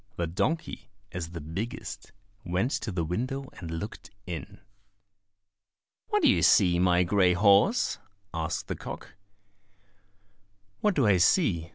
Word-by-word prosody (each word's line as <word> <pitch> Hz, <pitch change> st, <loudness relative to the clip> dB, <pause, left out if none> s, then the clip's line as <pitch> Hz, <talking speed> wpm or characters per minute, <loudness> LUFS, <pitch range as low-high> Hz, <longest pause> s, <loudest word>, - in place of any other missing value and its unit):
The 85 Hz, -, -1 dB
donkey, 105 Hz, -, -2 dB, 0.2 s
as 85 Hz, -3 st, -5 dB
the 85 Hz, 0 st, -7 dB
biggest, 100 Hz, -, -6 dB, 0.3 s
went 95 Hz, +8 st, -1 dB
to 110 Hz, -, -2 dB
the 90 Hz, -3 st, -1 dB
window 130 Hz, -, -3 dB
and 85 Hz, -, -7 dB
looked 80 Hz, +6 st, -6 dB, 0.2 s
in. 85 Hz, -4 st, -7 dB, 1.5 s
"What 420 Hz, -3 st, +1 dB
do -, -, +6 dB
you 260 Hz, -, +4 dB
see, 90 Hz, -4 st, +5 dB
my 90 Hz, 0 st, +4 dB
grey 90 Hz, 0 st, +3 dB
horse?" 100 Hz, -, +3 dB, 0.3 s
asked 80 Hz, 0 st, -3 dB
the -, -, -3 dB
cock. -, -, -8 dB, 1.7 s
"What 210 Hz, -3 st, +1 dB
do 135 Hz, -, +3 dB
I 100 Hz, -3 st, +5 dB
see?" 90 Hz, -, +2 dB
95 Hz, 135 wpm, -28 LUFS, 85-125 Hz, 1.7 s, do